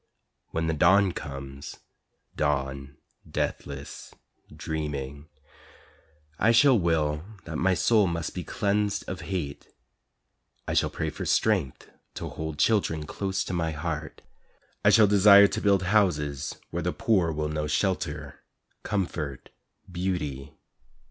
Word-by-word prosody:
When 80 0 -2
the 80 - 0
Dawn 95 +5 +4
comes 70 -2 -8 0.6
Dawn, 70 -1 -2 0.3
deathless, - - -5 0.4
dreaming 75 -2 -5 1.1
I 110 - +4
shall 125 0 +5
will 80 -3 0 0.2
that 80 -1 -5
my 95 +1 +3
soul 105 +3 +3
must 85 -2 -3
be - - -4
cleansed 100 0 -1
of 95 - -5
hate, 85 -8 -4 1.0
I - - -1
shall - - +2
pray - - -3
for - - -6
strength 95 - +1 0.3
to - - -5
hold 80 -1 -5
children 80 -5 +1
close 95 +3 -2
to - - -5
my 80 -2 -1
heart, 80 0 -5 0.6
I - - +6
shall 110 - +7
desire 100 0 +7
to 110 - -3
build 100 -2 +3
houses 75 -8 +1 0.2
where - - -2
the - - -1
poor 95 -7 +1
will 75 0 -2
know 75 0 -2
shelter, 75 -4 -2 0.4
comfort, 85 - -3 0.4
beauty. 75 -7 -3
80 Hz, 125 wpm, -27 LUFS, 75-100 Hz, 1.1 s, shall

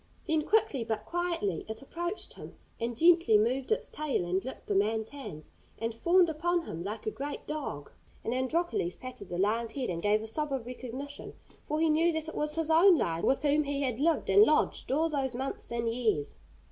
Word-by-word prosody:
Then 315 -1 +2
quickly 420 - +2
but 220 -1 -3
quietly 340 - -1
it 220 +4 -5
approached 345 +7 -4
him, - - -11 0.2
and 230 0 -3
gently 330 -8 +6
moved 250 +5 0
its 445 - +1
tail 295 -12 -1
and 185 +2 0
licked 260 - -8
the - - -1
man's 220 +2 +1
hands, 260 - -7 0.3
and 230 0 -2
fawned 345 +9 +4
upon 340 +2 0
him 165 +1 -5
like 210 +3 -5
a 215 - 0
great 285 +4 -5
dog. 275 - -5 0.3
And 230 - -1
Androcles 260 - 0
patted 255 -7 -9
the 175 - -3
lion's 225 +4 0
head, 260 -8 -2
and 170 -1 -3
gave 210 +2 +2
a - - -5
sob 300 +6 -3
of 265 -4 -2
recognition, 255 +3 -7 0.3
for 305 +1 -1
he 325 - +3
knew 320 +2 +3
that 315 0 -3
it - - -8
was 300 0 -1
his 325 -1 0
own 345 +2 +7
lion, 165 - 0
with 270 +1 +2
whom 295 +1 +3
he 280 0 -1
had 250 -3 -1
lived 320 +2 +2
and 405 - +7
lodged 310 -8 +3
all 310 +4 +3
those 270 -5 -2
months 265 -1 -4
and 235 0 -1
years. 225 -11 -1
265 Hz, 210 wpm, -30 LUFS, 220-315 Hz, 0.3 s, own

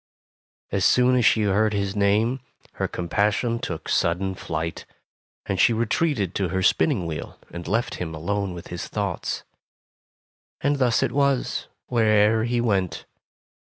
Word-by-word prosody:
As 95 -1 0
soon 125 +4 +4
as 125 -3 +3
she 110 - +4
heard 105 +2 +2
his 100 -1 -1
name, 105 +5 +2 0.3
her - - -2
com 85 - -5
passion 105 +5 +1
took - - -5
sudden 95 +3 +1
flight, 80 -2 -4 0.6
and 95 -2 -2
she 115 - +5
retreated 115 - 0
to 95 - 0
her 95 +1 -1
spinning 115 - +2
wheel 80 -2 -6
and 85 0 -7
left 115 +3 0
him 80 -2 -4
alone 100 +3 -2
with 85 - -9
his 90 -1 -5
thoughts. 100 -4 -3 1.2
And 145 +1 +1
thus 125 -3 +2
it - - 0
was, 140 -2 0 0.2
wher 120 -2 +1
e'er 110 +1 +4
he 120 0 0
went. 100 -7 0
105 Hz, 155 wpm, -24 LUFS, 95-115 Hz, 1.2 s, she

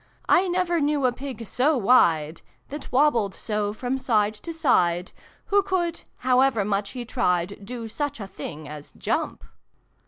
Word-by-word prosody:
I 375 +1 +4
never 350 -1 +1
knew 290 -1 +1
a 250 - +4
Pig 250 -2 -7
so 270 +8 +2
wide 170 -9 +3 0.3
That 295 +1 -7
wobbled 245 -8 +3
so 210 -1 -2
from 250 +4 -3
side 215 -5 +2
to 275 +10 -8
side 180 - +2 0.4
Who 405 - +6
could, 365 -4 -1 0.2
however 255 -4 +3
much 200 +1 -1
he 245 -2 -5
tried, 200 -5 -1
Do 230 +2 -6
such 290 +3 -3
a 200 - -5
thing 155 -5 -8
as 150 0 -9
jump - - -2
245 Hz, 155 wpm, -25 LUFS, 200-290 Hz, 0.4 s, Who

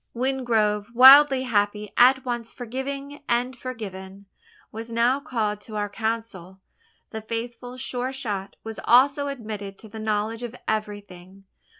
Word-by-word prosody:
Wingrove, 230 -5 0
wildly 270 +1 +8
happy 210 -3 -1
at 260 +2 +5
once 240 -2 -4
forgiving 275 +4 -6
and 245 +2 0
forgiven 200 -6 -8 0.5
was 225 +2 -8
now 235 +4 +2
called 220 -7 -2
to 215 0 -10
our 205 -1 -2
council. 210 -4 -4 0.5
The 220 - -5
faithful 235 +3 -6
Sure 255 0 -3
shot 210 -8 -5
was 225 0 -7
also 280 +3 +4
admitted 215 -7 -6
to 220 - -12
the 220 +1 -9
knowledge 215 +1 -2
of 240 0 -6
everything. 200 -3 -5
230 Hz, 130 wpm, -24 LUFS, 210-255 Hz, 0.5 s, wildly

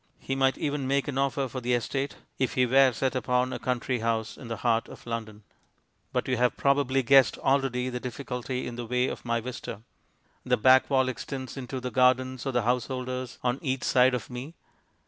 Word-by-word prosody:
He 135 - -4
might 135 0 +2
even 145 -2 -2
make 140 +1 +1
an 135 -2 -2
offer 135 0 0
for 130 +1 -6
the 125 0 +1
estate, 135 +4 -2 0.2
if 130 - 0
he 125 - +4
were 135 +1 +5
set 130 +3 -1
upon 125 +1 +1
a - - -4
country 125 0 -1
house 110 -1 -1
in 125 - -10
the 115 -1 -4
heart 115 -1 +2
of - - -12
London. 110 -3 -5 0.7
But - - -1
you 130 - +1
have 125 +1 +2
probably 140 -1 +2
guessed 135 +2 +5
already 135 -2 +1
the 125 -1 -3
difficulty 125 0 -4
in 120 -1 -6
the 120 -1 -5
way 125 +2 +1
of - - -5
my 115 0 +1
vista. 120 -3 -7 0.6
The - - +2
back 130 +4 +5
wall 130 -2 +3
extends 130 0 -5
into 130 -1 -5
the 125 0 -5
gardens 130 +1 +2
of 135 - -1
the 120 - +2
householders 125 +1 -2
on 125 +2 0
each 130 -3 -2
side 125 0 +4
of 110 -6 -5
me. 130 +7 -7
130 Hz, 205 wpm, -27 LUFS, 120-135 Hz, 0.7 s, were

